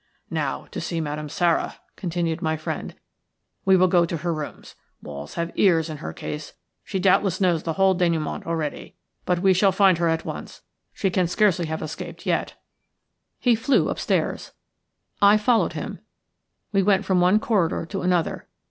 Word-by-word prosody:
"Now - - -2
to - - -5
see 170 - -3
Madame 150 -1 -4
Sara," 170 +2 +1 0.2
continued 170 -2 -2
my 160 0 0
friend. 155 - -5 0.7
"We 190 -1 +6
will 185 +1 +5
go 175 -1 +4
to 170 0 -2
her 170 +2 -2
rooms. 155 -2 -7 0.3
Walls 75 0 -8
have 170 0 -2
ears 165 -4 +3
in 155 - -6
her 150 - -6
case; 150 0 -6 0.3
she 195 - -4
doubtless 185 0 +2
knows 175 -4 +2
the 165 - -2
whole 190 +3 +3
dénouement 170 -4 -1
already; 160 -3 -3 0.3
but 180 0 +1
we 190 -1 +5
will 195 -2 +5
find 190 -3 +4
her 170 - +2
at 165 0 0
once, - - -7 0.3
she 195 - -1
can 180 -1 +1
scarcely 180 -2 +2
have 160 0 -4
escaped 155 - -7
yet." - - -1 0.8
He 245 - +3
flew 230 +5 +2
upstairs. - - -1 0.7
I 205 +1 +7
followed 225 +2 +2
him. - - -5 0.7
We 195 -1 +3
went 195 0 +2
from 185 -2 +2
one 185 +4 +4
corridor 195 -8 0
to 195 +3 -4
another. 180 -2 0
175 Hz, 170 wpm, -24 LUFS, 160-195 Hz, 0.8 s, I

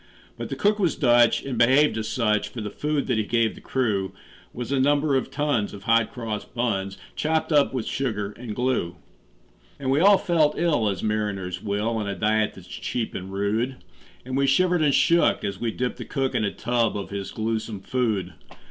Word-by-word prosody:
But - - -6
the - - -3
cook 210 +1 +2
was 180 -5 +1
Dutch, 120 -3 +4
and 130 -4 -3
behaved 135 +5 +5
as 110 -1 -3
such; 105 -4 +1
For 115 - -8
the 105 -2 -4
food 150 -1 -1
that 125 -4 0
he - - +1
gave 115 +1 +1
the - - -13
crew 100 -7 -1 0.4
Was 120 +1 -6
a 140 - +2
number 145 +1 +2
of 130 - 0
tons 140 -9 -1
of 100 - -11
hot 115 +1 +3
cross 110 -4 -4
buns, 100 -5 -2 0.2
Chopped 160 +1 0
up 145 -2 +4
with 130 -4 -3
sugar 105 -7 -2
and 110 0 -7
glue. 125 -9 -1 0.8
And 135 -2 -1
we 140 - +3
all 200 +3 +7
felt 160 -5 +2
ill 150 -11 +2
as 95 -3 -4
mariners 100 -4 -2
will, 105 +3 -1
On 105 -2 -2
a 100 - -2
diet 110 +3 +1
that's - - -12
cheap 115 -2 -4
and 95 +1 -6
rude; 105 +6 -1 0.5
And 130 0 -4
we 140 0 +2
shivered 175 +5 +3
and 145 -3 +3
shook 170 0 +3
as 100 -2 -3
we 120 - 0
dipped 125 +3 -3
the - - -7
cook 135 -1 -1
In - - 0
a 100 - 0
tub 115 -2 0
of 100 - -6
his 100 -1 -5
gluesome 110 -2 -3
food. 110 -5 -1
115 Hz, 205 wpm, -24 LUFS, 105-135 Hz, 0.8 s, all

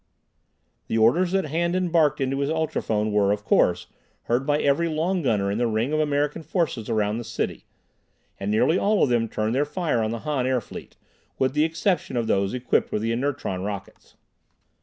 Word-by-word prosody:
The 110 - -1
orders 160 +12 +3
that 195 -3 +1
Handan 170 +3 -1
barked 160 -4 +3
into 135 0 -1
his 140 0 0
ultrophone 145 -9 -1
were, 100 -1 +3
of 105 0 -2
course, 90 0 +2 0.4
heard 125 +4 0
by 145 0 +2
every 150 +4 +2
long 170 +4 0
gunner 105 -8 +1
in 105 - -2
the 120 - +2
ring 115 +6 -1
of 155 - +1
American 145 +1 0
forces 155 - -2
around 105 0 0
the - - -5
city, - - -4 0.7
and 100 - -3
nearly 110 - +3
all 210 0 +2
of - - +2
them 115 -2 +1
turned 110 +1 -1
their 135 +3 +2
fire 150 -5 -1
on 110 - 0
the 115 0 -4
Han 145 -5 -1
airfleet, 125 -4 -4 0.4
with 130 -1 +1
the 150 +1 +3
exception 165 -4 -1
of 120 - 0
those 100 -2 +1
equipped 125 0 0
with 105 - -1
the 115 - 0
inertron 125 -6 -2
rockets. 100 -1 -7
130 Hz, 190 wpm, -24 LUFS, 110-160 Hz, 0.7 s, orders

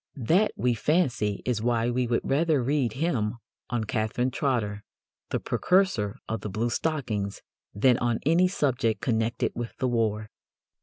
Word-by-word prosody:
That, 170 - +2
we 125 0 +1
fancy, 120 - 0
is 120 -4 0
why 120 0 +1
we 125 0 0
would 115 0 +1
rather 150 -1 +2
read 135 -3 +1
him 125 -8 0 0.3
on 120 -2 -1
Catherine 110 +4 -1
Trotter, 110 -7 -1 0.5
the - - -1
precursor 180 - +1
of 115 -2 -3
the 105 - -4
bluestockings, 115 -1 -2 0.3
than 120 +4 +4
on 120 -2 +1
any 170 +4 +4
subject 125 - 0
connected 115 -1 0
with 120 -1 -6
the 130 - 0
war. 110 -3 0
120 Hz, 145 wpm, -27 LUFS, 110-140 Hz, 0.5 s, than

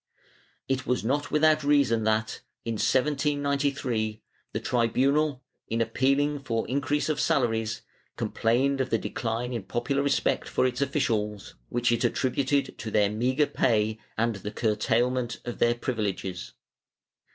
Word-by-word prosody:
^ - - -35 0.4
It 135 -1 -1
was 125 -2 0
not 145 +4 0
without 155 0 +3
reason 140 -6 +3
that, 110 0 0 0.2
in 115 - -1
1793, 140 -4 0 0.3
the - - -2
tribunal, 130 +4 +1 0.2
in 115 - -1
appealing 140 +5 +1
for 115 -5 -2
increase 140 +4 0
of 155 - -1
salaries, 115 -4 0 0.3
complained 135 +4 +1
of 130 - -2
the 115 - +2
decline 115 +3 -3
in 115 - -2
popular 120 +8 -1
respect 140 0 0
for - - +1
its 125 +1 -1
officials, 115 -8 -1 0.2
which 120 0 +1
it 120 0 +1
attributed 135 +1 0
to 110 - -4
their 105 -1 +2
meagre 130 +7 +2
pay 110 -5 +1 0.2
and 115 -1 +1
the 100 +1 -5
curtailment 115 +3 0
of 120 - -5
their 120 0 +3
privileges. 100 -7 -3
125 Hz, 140 wpm, -27 LUFS, 110-140 Hz, 0.4 s, without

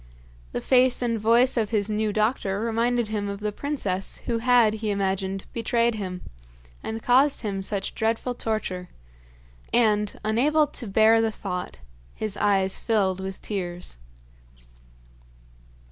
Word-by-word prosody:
The - - -3
face 255 -1 +3
and 230 -2 0
voice 235 +4 +4
of 220 -3 +1
his 210 -3 0
new 215 0 0
doctor 210 -2 0
reminded 230 +1 0
him 205 -2 -2
of 200 0 -5
the 210 0 -2
princess 205 -7 -2
who 230 -1 0
had, 240 -2 +4
he 220 0 -3
imagined, 195 -1 -1
betrayed 235 0 +1
him, 185 -4 -5 0.6
and 225 0 -5
caused 270 +3 +4
him 200 -3 -2
such 195 0 -3
dreadful 225 +3 -1
torture; 215 -6 -3 0.8
and, 210 -3 +2
unable 280 +9 +3
to 275 -5 -4
bear 220 +3 +5
the 225 - +1
thought, 180 - -5 0.4
his 215 -2 -2
eyes 195 -2 +1
filled 195 -5 +1
with 190 0 -6
tears. 180 - -4
215 Hz, 135 wpm, -25 LUFS, 195-235 Hz, 0.8 s, bear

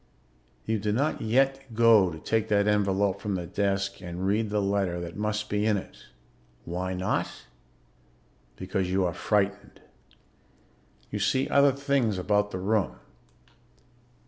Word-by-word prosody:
You 110 -1 0
do 105 +1 -1
not 140 +8 0
yet 135 +2 +1
go 110 -5 +6
to 80 - -7
take 110 +6 -1
that 100 -1 +2
envelope 100 -2 +1
from 105 -3 -2
the 90 -2 -3
desk 100 +2 -1
and 90 +1 -5
read 105 +2 +1
the 105 0 0
letter 100 -3 0
that 85 -1 -7
must 105 0 -2
be 105 0 -1
in 105 -1 +2
it. 95 - -10 0.6
Why 90 +2 -3
not? 90 +1 -1 1.3
Because 95 +2 -2
you 95 0 +1
are 85 - -1
frightened. 100 +1 -1 1.3
You - - -3
see 130 0 +1
other 140 0 +5
things 135 -6 0
about 105 +2 +1
the 95 - -5
room. 100 +1 0
100 Hz, 145 wpm, -27 LUFS, 95-110 Hz, 1.3 s, go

